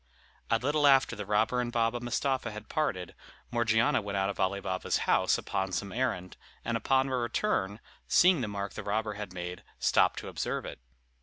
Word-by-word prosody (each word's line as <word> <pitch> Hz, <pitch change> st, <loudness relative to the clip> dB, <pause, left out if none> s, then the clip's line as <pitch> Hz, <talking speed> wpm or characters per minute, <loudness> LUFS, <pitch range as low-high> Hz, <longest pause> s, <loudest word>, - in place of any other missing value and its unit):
A 115 Hz, -, +4 dB
little 145 Hz, +4 st, +2 dB
after 135 Hz, -3 st, +5 dB
the 105 Hz, -3 st, -6 dB
robber 110 Hz, +4 st, +2 dB
and 120 Hz, -1 st, -3 dB
Baba 115 Hz, 0 st, +1 dB
Mustapha 130 Hz, +1 st, -1 dB
had 110 Hz, 0 st, -8 dB
parted, 100 Hz, -, -1 dB, 0.4 s
Morgiana 115 Hz, -1 st, +2 dB
went 100 Hz, -1 st, -3 dB
out 95 Hz, +1 st, +1 dB
of 95 Hz, -, -11 dB
Ali 100 Hz, +1 st, +1 dB
Baba's 95 Hz, -1 st, -1 dB
house -, -, +3 dB
upon 95 Hz, 0 st, -2 dB
some 100 Hz, +2 st, -3 dB
errand, 100 Hz, -8 st, -2 dB, 0.3 s
and -, -, -1 dB
upon 135 Hz, 0 st, +2 dB
her 130 Hz, -1 st, -1 dB
return, 115 Hz, -, -1 dB, 0.3 s
seeing 180 Hz, -5 st, +5 dB
the 115 Hz, -, -1 dB
mark 100 Hz, -1 st, -4 dB
the -, -, -5 dB
robber 105 Hz, +1 st, -1 dB
had 105 Hz, -2 st, -6 dB
made, 90 Hz, 0 st, -6 dB, 0.2 s
stopped -, -, +3 dB
to -, -, -6 dB
observe -, -, -3 dB
it. -, -, -7 dB
110 Hz, 185 wpm, -30 LUFS, 100-125 Hz, 0.4 s, after